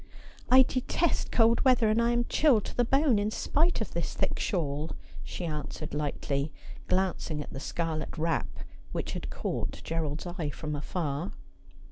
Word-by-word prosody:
' - - -22
I 260 +1 +9
detest 260 +6 0
cold 230 0 +4
weather, 250 -4 +5
and 215 +2 +3
I 235 - +3
am 240 0 +2
chilled 265 -9 +4
to - - -6
the 245 - +3
bono, 270 -3 +3
in 205 - +1
spite 310 +7 +1
of 220 - -3
this 170 -1 -3
thick - - 0
shawl,' 155 -5 -1 0.3
she 180 - -5
answered 150 -4 -4
lightly, 145 0 -1 0.4
glancing 185 -4 0
at 145 - -6
the 135 - -5
scarlet 160 +1 -3
wrap 165 +1 +1 0.5
which - - -2
had - - -4
caught - - -3
Gerald's 160 -1 -2
eye 175 -4 -3
from 150 +1 -4
afar. 150 +2 -3
175 Hz, 165 wpm, -29 LUFS, 150-235 Hz, 0.5 s, I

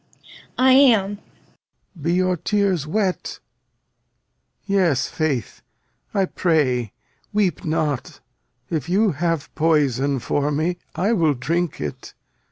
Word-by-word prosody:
I 260 +1 +5
am! 240 -7 +5
Lear. 205 - -7 0.8
Be 165 +4 0
your 185 0 +2
tears 190 -4 0
wet? 195 +1 -1 1.3
Yes, 185 -9 +2
faith. 145 -8 -2 0.5
I 195 -2 +1
pray 130 - 0 0.4
weep 205 -4 0
not. 155 -4 -2 0.5
If 155 -2 -2
you 200 +3 +3
have 165 0 -2
poison 145 -4 +1
for 145 +4 -1
me, 160 +4 -1 0.2
I 205 +5 +1
will 160 -8 +2
drink 165 +6 -2
it. 75 -2 -6
165 Hz, 110 wpm, -22 LUFS, 145-195 Hz, 1.3 s, I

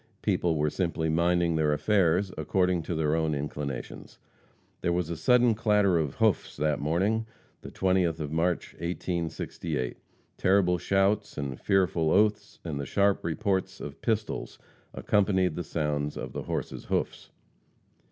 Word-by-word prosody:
People 90 -5 +1
were 75 0 +1
simply 85 -3 -1
minding 85 +1 +2
their 75 -1 +2
affairs 95 +1 +2
according 90 +3 +1
to 85 +2 -4
their 80 -1 +1
own 80 -2 0
inclinations. 70 -2 -5 0.6
There 85 - +1
was 85 -1 -1
a - - -2
sudden 125 +5 +4
clatter 105 -5 +3
of 75 -4 -2
hoofs - - +1
that 75 0 0
morning, 100 +9 0 0.3
the - - -8
20th 90 -3 +1
of 75 -2 -4
March, 85 +2 0
1868. 85 -5 -3 0.4
Terrible 95 -2 +3
shouts 100 +3 +1
and 70 -3 -4
fearful 90 -5 +2
oaths, 105 +2 +2
and 75 -4 -3
the 70 - -3
sharp 100 +3 +2
reports 95 +2 -1
of 75 +1 -8
pistols 110 -2 -2 0.3
accompanied 95 -4 +1
the 90 - -3
sound 75 -3 -2
of - - -6
the - - -4
horses' - - -4
hoofs. - - -2
85 Hz, 140 wpm, -28 LUFS, 80-95 Hz, 0.6 s, sudden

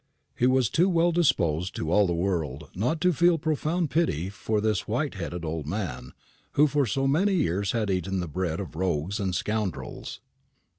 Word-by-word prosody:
He 125 - +2
was 130 -2 +3
too 180 +4 +3
well 170 -1 +3
disposed 90 - +1
to 80 - -2
all 105 +1 +4
the 85 - 0
world 80 -6 -2
not 125 - -1
to 180 -1 +3
feel 170 +2 +4
profound 155 +1 -1
pity 95 - +1
for 105 +1 -2
this 105 -3 0
white - - -1
headed 85 -1 -5
old 80 -2 -4
man, 75 -10 -4 0.4
who 150 - +5
for 145 -2 +1
so 135 +6 0
many 190 +8 +2
years 100 - 0
had 110 -4 0
eaten 95 +1 -1
the 90 - -3
bread 85 0 -2
of 95 -5 -6
rogues 90 +3 -1
and 95 -3 -1
scoundrels. 105 -4 -3
100 Hz, 185 wpm, -27 LUFS, -, 0.4 s, who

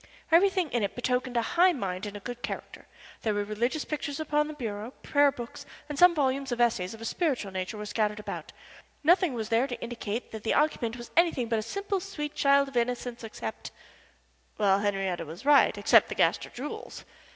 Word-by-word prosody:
Everything 365 -1 +4
in 240 - +1
it 200 -2 -2
betokened 250 0 -1
a 235 - +2
high 355 +1 +5
mind 195 - -3
and 205 0 -6
a - - -11
good 245 +3 -7
character. - - -6 0.3
There 215 -2 0
were 205 - 0
religious 235 +8 -1
pictures 290 -1 -4
upon 300 -1 +1
the 305 - -7
bureau, 225 -2 -5
prayer 285 -1 +4
books, 240 -4 -8 0.2
and 295 -2 -5
some 355 -1 +7
volumes 270 -2 0
of 240 - -2
essays 225 -5 +1
of 225 - -14
a - - -5
spiritual 255 - -1
nature 190 +3 -4
were 210 - -5
scattered 210 0 -1
about 210 - -6 0.5
nothing 345 -3 +4
was 220 -2 -4
there 230 +4 +3
to 245 - -5
indicate 235 -1 -5
that 220 - -6
the 220 - 0
occupant 245 -6 +1
was 240 -1 -10
anything 325 -9 +3
but 225 -1 +1
a - - -1
simple, 395 - -2
sweet 300 -6 -5
child 280 0 +4
of 260 - -4
innocence 240 0 -1
except 115 - -6 0.9
Well, 195 -1 +3
Henriette 195 -5 -1
was 165 - -9
right 290 -1 +5
except - - +5
the - - -4
Gaster - - +2
jewels. 275 +5 -7
245 Hz, 200 wpm, -28 LUFS, 215-295 Hz, 0.9 s, some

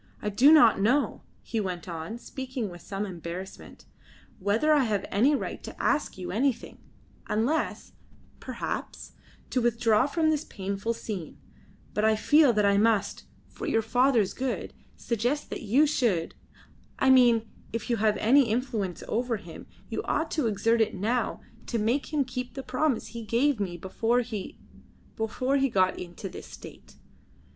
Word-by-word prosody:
"I 210 - -2
do 250 +9 +6
not 300 -11 +6
know;" 255 +8 +1 0.2
he 225 - -3
went 180 -4 -4
on, 170 +6 -5
speaking 255 -3 -5
with 175 -1 -11
some 200 +1 -4
embarrassment, 180 0 -8 0.5
"whether 220 +11 +2
I 285 -4 +4
have 205 -4 -1
any 255 +9 +4
right - - -4
to - - -10
ask 295 - 0
you 185 - -5
anything, 250 +4 -1 0.5
unless, 240 +9 -1 0.5
perhaps, - - -5 0.4
to 255 - +1
withdraw 235 0 +3
from 315 +1 +1
this 305 -1 0
painful 200 +3 -3
scene, 200 -7 -6 0.6
but 210 - 0
I 220 0 +4
feel 290 +5 +5
that 210 -2 +2
I 200 0 +4
must 215 -2 +1 0.2
for 415 - -7
your 225 -7 +1
father's 245 -3 +2
good 260 0 -3 0.2
suggest 245 +6 -2
that - - -4
you 245 +8 +4
should 230 - 0 0.6
I 265 - +4
mean 240 -3 +5 0.2
if 230 -1 -4
you 235 - +1
have 215 0 +2
any 265 +5 +5
influence 220 - -2
over 235 0 -1
him 170 -5 -11 0.2
you - - -3
ought 320 - -1
to 300 -7 0
exert 225 +2 +2
it 220 - +1
now 225 +6 -1 0.3
to 235 - -1
make 235 +8 0
him 295 -3 +1
keep 250 0 -6
the 270 - -5
promise 260 0 -1
he 235 - -7
gave 235 +4 +1
me 180 -4 -3
before 225 +7 0
he 220 -5 -6 0.6
before 255 +5 0
he 275 0 +2
got 185 -4 +2
into 175 +2 -7
this - - -9
state." - - -12
230 Hz, 160 wpm, -27 LUFS, 205-260 Hz, 0.6 s, do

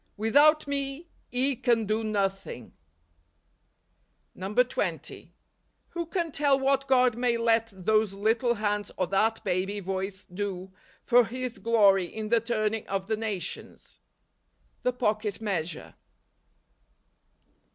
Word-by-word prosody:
" - - -43
Without 290 +8 +4
me 280 +3 -3 0.2
ye 260 +2 +1
can 235 -2 +1
do 215 +2 0
nothing." 195 - -3 1.6
NOVEMBER. 200 +6 +1
131 250 +1 -1
20. - - -11 0.6
Who 340 -1 -4
can 340 -2 -2
tell 280 -1 +2
what 275 0 +1
God 250 -3 +4
may 240 -1 +1
let 230 -1 +2
those 205 +2 +1
little 225 +4 +1
hands 210 -1 -2
or 185 - +1
that 215 +5 +1
baby 190 +3 -1
voice 190 0 -4
do 190 0 -5 0.3
for 245 0 +5
His 250 +1 -5
glory 200 -5 +4
in 215 +4 -6
the 235 0 +4
turning 220 -2 -1
of 195 -1 -2
the 220 +2 0
nations? 210 -6 -6 0.8
The 250 - +1
Pocket 215 -4 -1
Measure. 180 -7 -3
220 Hz, 125 wpm, -27 LUFS, 200-250 Hz, 1.6 s, for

